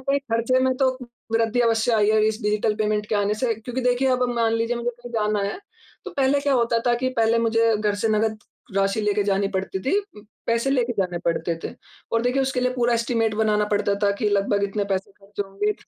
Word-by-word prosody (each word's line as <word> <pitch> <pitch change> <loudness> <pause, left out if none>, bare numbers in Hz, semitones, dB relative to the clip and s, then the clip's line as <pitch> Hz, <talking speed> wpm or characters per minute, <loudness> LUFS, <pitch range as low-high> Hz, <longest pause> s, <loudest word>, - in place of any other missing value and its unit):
कहीं 280 +1 +3
ख़र्चे 235 +3 +2
में 260 - +2
तो 265 0 +3
उ 255 -1 -9 0.3
वृद्धि 230 +1 +1
अवश्य 230 0 +2
आई 210 -2 +3
है 215 0 +3
इस 220 +1 -3
डिजिटल 210 +1 +1
पेमेंट 210 -1 0
के 215 - -1
आने 205 0 +1
से। 230 +1 0
क्योंकि 245 +4 -5
देखिए 250 +2 +2
अब 255 -1 +2
मान 230 -1 +1
लीजिए 230 +1 0
मुझे 235 0 -2
कहीं 240 0 -12
जाना 210 -1 0
है, 200 - -1 0.5
तो - - -6
पहले 275 +1 +2
क्या 285 0 +1
होता 235 -2 +2
था 240 - +4
कि 260 - +2
पहले 230 0 +3
मुझे 230 -1 +2
घर 210 -1 0
से 225 - 0
नकद 215 0 +1 0.4
राशि 195 +2 +1
लेके 210 0 +1
जानी 195 0 +1
पड़ती 190 -1 -3
थी 270 - +1
उम, 395 - -9 0.2
पैसे 230 +3 +1
लेके 250 -3 +1
जाने 180 -2 0
पड़ते 170 0 0
थे। - - -3 0.4
और 230 0 +2
देखिए, 250 +2 +1
उसके 265 -1 -1
लिए 250 0 +1
पूरा 240 -1 +2
एस्टीमेट 230 -1 0
बनाना 210 -1 +2
पड़ता 205 0 +1
था 200 - +4
कि 215 - +1
लगभग 200 0 +1
इतने 200 +1 -2
पैसे 190 +1 -2
ख़र्च 200 +1 -10
होंगे। 205 +2 -1
225 Hz, 230 wpm, -23 LUFS, 210-245 Hz, 0.5 s, था